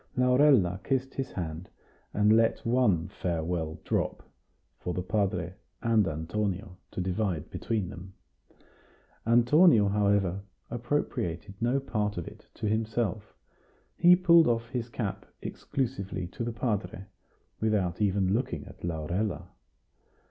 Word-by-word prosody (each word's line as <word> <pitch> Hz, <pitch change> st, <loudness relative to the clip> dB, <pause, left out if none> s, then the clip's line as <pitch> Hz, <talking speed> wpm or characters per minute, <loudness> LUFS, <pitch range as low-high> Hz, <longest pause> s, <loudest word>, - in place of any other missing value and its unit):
Laurella 125 Hz, -8 st, +4 dB
kissed 135 Hz, -1 st, -1 dB
his 135 Hz, 0 st, -4 dB
hand, 85 Hz, -1 st, -5 dB, 0.4 s
and 105 Hz, +1 st, +4 dB
let 115 Hz, 0 st, +2 dB
one 115 Hz, -8 st, +2 dB
farewell 85 Hz, -3 st, -3 dB
drop, -, -, -1 dB, 0.6 s
for 90 Hz, -, -4 dB
the 90 Hz, -, -2 dB
padre 95 Hz, -4 st, -1 dB, 0.3 s
and 115 Hz, -4 st, +3 dB
Antonio 90 Hz, +5 st, -3 dB
to -, -, -7 dB
divide 90 Hz, -3 st, -1 dB
between 110 Hz, -6 st, -2 dB
them. 95 Hz, +2 st, -10 dB, 1.1 s
Antonio, 120 Hz, -, +6 dB
however, 100 Hz, -2 st, +2 dB, 0.3 s
appropriated 115 Hz, -, -2 dB
no 120 Hz, +4 st, +2 dB
part 105 Hz, -7 st, -2 dB
of 85 Hz, -, -4 dB
it -, -, -12 dB
to 110 Hz, -, -3 dB
himself; 110 Hz, -1 st, -1 dB, 0.6 s
he 175 Hz, +1 st, +7 dB
pulled 170 Hz, -2 st, +6 dB
off 115 Hz, -1 st, 0 dB
his 125 Hz, -2 st, -3 dB
cap 110 Hz, -5 st, -3 dB, 0.2 s
exclusively 105 Hz, -8 st, -3 dB
to 90 Hz, +6 st, -6 dB
the 120 Hz, -, -2 dB
padre, 105 Hz, -5 st, -2 dB, 0.5 s
without 105 Hz, -5 st, 0 dB
even 95 Hz, -2 st, +2 dB
looking 120 Hz, +4 st, -2 dB
at -, -, -14 dB
Laurella. 85 Hz, +5 st, -2 dB
105 Hz, 120 wpm, -29 LUFS, 90-120 Hz, 1.1 s, he